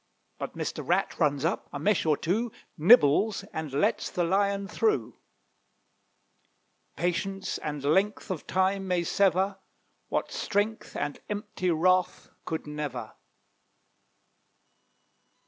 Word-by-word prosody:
But - - -6
Mr. - - -3
Rat - - 0
runs 145 0 +2
up; 165 - -1
a - - -4
mesh 205 -5 +1
or 150 -2 +3
two 220 +8 -1 0.2
Nibbles, 195 - +5
and 160 -3 -4
lets 140 - +1
the 175 - -1
Lion 200 +2 +1
through 425 - 0 1.8
Patience 195 +2 -2
and 150 -2 -4
length 190 +8 +1
of 175 - -5
time 190 +1 +1
may 180 -2 +1
sever, 190 +2 +2 0.5
What - - -1
strength 215 +2 -1
and 145 - -3
empty 210 -3 -2
wrath 180 +2 +2
could 160 - -3
never. 145 -6 -5
185 Hz, 110 wpm, -28 LUFS, 155-200 Hz, 1.8 s, Nibbles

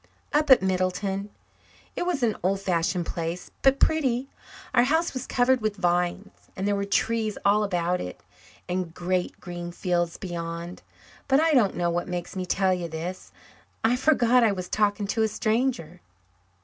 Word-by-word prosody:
"Up 300 0 +2
at 260 -6 +7
Middleton. 190 +2 -1 0.7
It 350 - -2
was 315 -8 0
an 220 -3 +2
old 195 +2 +1
fashioned 175 -1 0
place, 170 +2 -4
but 270 0 +4
pretty 270 -4 +1 0.4
our 240 - +6
house 320 +5 +1
was 255 0 -5
covered 250 0 +2
with 215 -1 -1
vines, 180 +1 0 0.2
and 190 +1 -2
there 205 - +2
were 200 0 -1
trees 220 +1 0
all 205 +1 +4
about 180 -2 0
it, 90 - -7 0.5
and 180 -2 -3
great 180 0 -2
green 175 -1 -6
fields 175 -1 -1
beyond. 170 -1 -6 0.5
But 270 0 +4
I 320 0 +3
don't 230 -8 +3
know 175 -1 +1
what 175 +1 -2
makes 180 0 -5
me 185 -1 -3
tell 190 +1 +2
you 175 -2 -3
this. 170 +4 -6 0.5
I 225 +2 +4
forgot 250 -3 +4
I 220 -3 +4
was 185 -2 -5
talking 205 -1 +1
to 215 +3 -1
a 220 - +4
stranger." 215 -6 -1
195 Hz, 170 wpm, -26 LUFS, 175-235 Hz, 0.7 s, at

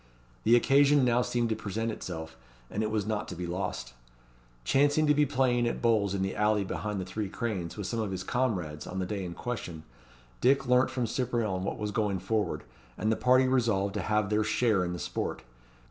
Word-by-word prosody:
The 115 +2 +6
occasion 140 +2 +5
now 120 0 +3
seemed 120 -1 0
to 110 - 0
present 110 +3 -3
itself, 80 -6 -6 0.4
and 105 - -2
it 110 - 0
was 110 -2 -1
not 105 -1 -2
to 90 - -6
be 90 +1 -4
lost. 85 -8 -4 0.7
Chancing 145 - +3
to 150 - +5
be 150 0 +3
playing 125 -3 +2
at - - -2
bowls 105 -4 +2
in 95 - 0
the 95 - -2
alley 105 -1 +2
behind 105 +1 -3
the 95 - -3
Three 100 +2 -4
Cranes 100 -6 -3
with 105 - -4
some 115 +5 -2
of 110 -2 -1
his 95 -1 -4
comrades 95 -11 -2
on 95 - -6
the 95 - -1
day 100 0 -3
in 85 -1 -6
question, 90 -10 -5 0.6
Dick 135 +2 +4
learnt 125 +1 +4
from 125 -2 -1
Cyprien 115 -6 -1
what 95 - -3
was 105 -1 -3
going 105 -3 0
forward, 110 +3 -1 0.3
and 110 - +1
the - - +2
party 130 +2 +4
resolved 115 -7 +1
to 105 - -2
have 105 -1 0
their 105 +1 +3
share 110 -2 +2
in 90 0 -2
the - - -4
sport. - - -4
110 Hz, 210 wpm, -29 LUFS, 95-120 Hz, 0.7 s, The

